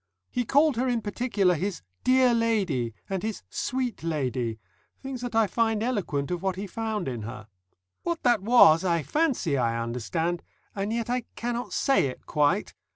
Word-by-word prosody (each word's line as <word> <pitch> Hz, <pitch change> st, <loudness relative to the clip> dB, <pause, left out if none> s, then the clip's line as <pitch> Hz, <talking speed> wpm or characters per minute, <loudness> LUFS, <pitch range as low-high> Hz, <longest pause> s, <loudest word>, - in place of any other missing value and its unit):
He 245 Hz, -1 st, -1 dB
called 285 Hz, +1 st, +3 dB
her 255 Hz, +2 st, +1 dB
in 240 Hz, -3 st, 0 dB
particular 205 Hz, -4 st, +1 dB
his 180 Hz, -, -3 dB, 0.2 s
"Dear 255 Hz, -1 st, +5 dB
Lady" 190 Hz, -, 0 dB
and 190 Hz, -2 st, -2 dB
his 220 Hz, -1 st, -4 dB
"Sweet 255 Hz, -3 st, -2 dB
Lady," 130 Hz, -8 st, -1 dB, 0.5 s
things 265 Hz, -2 st, -5 dB
that 245 Hz, -2 st, -4 dB
I 225 Hz, -1 st, +5 dB
find 225 Hz, 0 st, 0 dB
eloquent 180 Hz, -, -1 dB
of 175 Hz, -1 st, -2 dB
what 190 Hz, -1 st, -1 dB
he 195 Hz, +2 st, -4 dB
found 215 Hz, -1 st, -3 dB
in 120 Hz, -4 st, -3 dB
her. 110 Hz, 0 st, -8 dB, 0.5 s
What 340 Hz, -1 st, -3 dB
that 240 Hz, -5 st, +4 dB
was 190 Hz, -7 st, +6 dB
I 170 Hz, -4 st, +1 dB
fancy 255 Hz, -, +1 dB
I 115 Hz, -1 st, +1 dB
understand, 125 Hz, +9 st, -2 dB, 0.3 s
and 200 Hz, +1 st, -2 dB
yet 230 Hz, 0 st, -1 dB
I 250 Hz, -1 st, -1 dB
cannot 240 Hz, +1 st, -3 dB
say 270 Hz, -, +2 dB
it 130 Hz, -, -8 dB
quite. 155 Hz, +6 st, +1 dB
205 Hz, 170 wpm, -27 LUFS, 155-240 Hz, 0.5 s, was